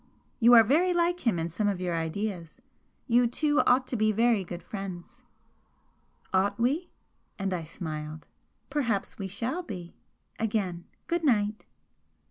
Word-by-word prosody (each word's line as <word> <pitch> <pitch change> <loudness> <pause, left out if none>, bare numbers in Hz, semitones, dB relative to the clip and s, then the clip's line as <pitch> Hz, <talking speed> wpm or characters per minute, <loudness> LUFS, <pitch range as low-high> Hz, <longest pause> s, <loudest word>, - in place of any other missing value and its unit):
You 240 0 +7
are 230 - +9
very 340 - +3
like 345 -4 +1
him 215 - +3
in 165 0 -1
some 195 +6 -1
of 200 -3 0
your 180 -2 -1
ideas 165 +1 -3 0.5
you 240 0 +4
two 295 +5 +1
ought 255 +1 +4
to 255 - -4
be 215 -1 +3
very 225 -1 +3
great 175 0 -7
friends." 195 +4 -7 1.1
"Ought 200 +2 +2
we?" 280 +9 +1 0.5
and 195 -1 -2
I 170 -3 -3
smiled 155 -2 -6 0.5
"Perhaps 235 -11 -1
we 195 - -3
shall 230 - -2
be! 185 - -8 0.5
Again, 200 -6 -1 0.2
Good 340 0 -1
night!" 215 -6 +1
210 Hz, 145 wpm, -28 LUFS, 180-245 Hz, 1.1 s, are